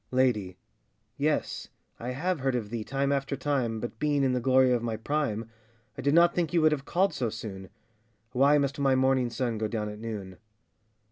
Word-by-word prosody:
LADY. 110 -8 +1 0.6
Yes! - - -1 0.3
I 120 - -4
have 160 +7 -1
heard 135 -1 0
of 110 -4 -3
thee 115 -2 -3
time 135 +4 -1
after 140 0 -1
time, 130 -5 -1
But 120 - -6
being 145 -2 +1
in 130 -1 +2
the 125 - +1
glory 130 +1 +4
of 120 -2 +2
my 115 -2 -2
prime, 115 -3 -1 0.5
I - - -6
did 140 +3 +2
not 170 0 +6
think 170 -3 -1
you 170 - +4
would 155 - +6
have 140 -2 -2
called 190 +3 +1
so 120 -3 -1
soon. 100 -4 -7 0.6
Why 140 +3 +4
must 140 0 -1
my 135 -1 +3
morning 130 -1 +2
sun 120 -2 -2
go 110 - 0
down 105 -1 -3
at 105 0 -8
noon? 105 -5 -6
130 Hz, 200 wpm, -28 LUFS, 115-140 Hz, 0.6 s, not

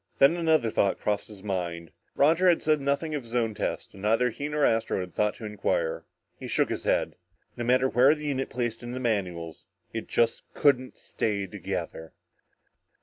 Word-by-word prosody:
Then 140 +5 +6
another 160 -9 +2
thought 100 -2 +1
crossed 105 -1 -1
his 105 -3 -13
mind. 85 -4 -3 0.2
Roger 165 +6 +4
had 170 - +2
said 155 -1 +2
nothing 140 +3 -1
of 145 - -1
his 115 0 -9
own 115 -2 +1
test - - -4
and 95 - -12
neither 115 +4 +2
he 145 +6 -5
nor 150 -1 +2
Astro 115 -3 +1
had 90 -1 -5
even 105 +2 0
inquired. - - -1 0.3
He - - -6
shook - - +1
his - - -4
head. - - +1 0.4
No 120 - -4
matter 130 +2 +3
where 130 +4 +5
the 150 0 -8
unit 135 -2 -1
placed 120 -2 -3
in 120 0 -6
the 130 - -4
manuals, 90 -9 -3 0.3
it - - -4
just 115 -1 +1
couldn't 130 -3 +2
stay 100 -3 -2
together. 90 -4 -5
120 Hz, 185 wpm, -27 LUFS, 100-145 Hz, 0.4 s, Then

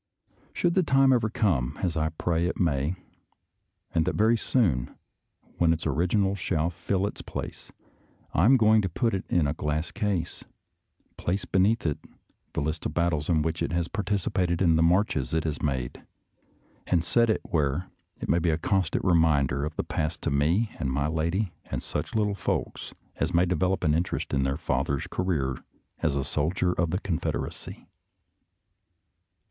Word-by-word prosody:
Should 175 -1 +1
the 185 - +4
time 135 -4 +4
ever 115 -3 +2
come, 85 - 0
as 85 -3 0
I 80 0 +1
pray 85 +1 0
it - - -3
may, 75 -1 +1 1.0
and 80 - +3
that 90 - -1
very 110 +2 +4
soon, 90 - +1 0.6
when 85 -1 +4
its 80 -1 -1
original 90 +6 +1
shall 85 -4 -1
fill 95 +3 -1
its 100 - -5
place, - - -7 0.6
I 85 - +3
am 130 +4 +7
going 110 -1 +5
to 95 - -2
put 115 +7 0
it 95 - -2
in 85 -3 +2
a 70 - 0
glass 75 +1 -2
case, 100 -7 -2 0.7
place 95 +3 -2
beneath 100 +4 +2
it 75 -3 0 0.6
a - - +1
list 80 +3 -2
of 75 - -8
the - - +1
battles 80 -3 0
in 80 -3 +3
which 80 +1 -2
it 85 - -1
has 85 -1 0
participated 95 -4 -1
and 85 -4 +4
the 80 - +3
marches 80 -6 +2
it 80 - +1
has 80 -2 -3
made, 65 -4 -2 0.8
and 85 -3 +2
set 115 +6 +3
it 110 - +1
where 75 +3 0 0.3
it - - -5
may 85 - +3
be 85 0 +1
a 80 - +2
constant 95 +1 0
reminder 75 -6 +3
of 75 +1 -4
the - - -1
past 80 0 -3
to 80 - 0
me 85 +11 +2
and 65 -4 -1
my 70 +2 0
lady 85 +5 -1
and - - -4
such - - -4
little 105 -2 +2
folks 100 - -3 0.3
as - - -1
may 85 +2 +5
develop 90 +1 0
an 75 - +3
interest 85 -1 -1
in 70 - +2
their 70 +1 0
father's 70 +1 -1
ca - - -3
reer 70 -9 -1 0.4
as 75 -4 0
a 70 - 0
soldier 80 +6 0
of 85 -2 0
the 90 - 0
Confederacy. 90 -7 -4
85 Hz, 180 wpm, -27 LUFS, 75-95 Hz, 1.0 s, am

